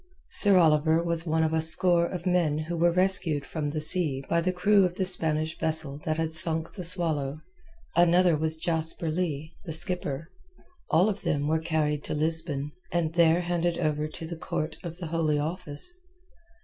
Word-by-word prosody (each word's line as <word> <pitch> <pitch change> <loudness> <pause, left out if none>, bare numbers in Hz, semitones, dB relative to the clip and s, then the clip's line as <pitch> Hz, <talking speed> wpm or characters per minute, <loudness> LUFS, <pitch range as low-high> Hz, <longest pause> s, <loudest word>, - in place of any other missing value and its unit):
Sir 200 -3 +5
Oliver 160 0 +3
was 170 0 -2
one 160 0 +1
of 160 0 -1
a 160 - +1
score 170 +2 +2
of 175 -1 -7
men 175 -5 +1
who 160 +2 -4
were 170 +1 +2
rescued 175 -5 +2
from 150 -3 -4
the 155 +1 -4
sea 155 -4 0
by 170 - +1
the 185 +2 0
crew 200 +3 +3
of 180 -1 -1
the 190 - -1
Spanish 160 -3 0
vessel 155 -3 0
that 155 0 -1
had 160 0 0
sunk 160 0 +4
the 185 - -7
Swallow; 155 -5 +1 0.5
another 175 0 +4
was 160 +1 -1
Jasper 160 0 -1
Leigh, 155 -2 -3
the 165 - -6
skipper. 165 -2 -1 0.6
All 175 +6 +3
of 210 - -3
them 145 -1 -1
were 160 +1 +1
carried 155 -2 -1
to - - -3
Lisbon, 155 -2 -2 0.2
and 165 -2 -1
there 170 0 +3
handed 175 -1 -1
over 155 -2 -1
to 160 - -9
the 170 +1 -6
Court 160 0 -4
of 170 -1 -8
the 180 - -7
Holy 160 -2 -1
Office. 155 - -1
160 Hz, 185 wpm, -26 LUFS, 155-175 Hz, 0.6 s, Sir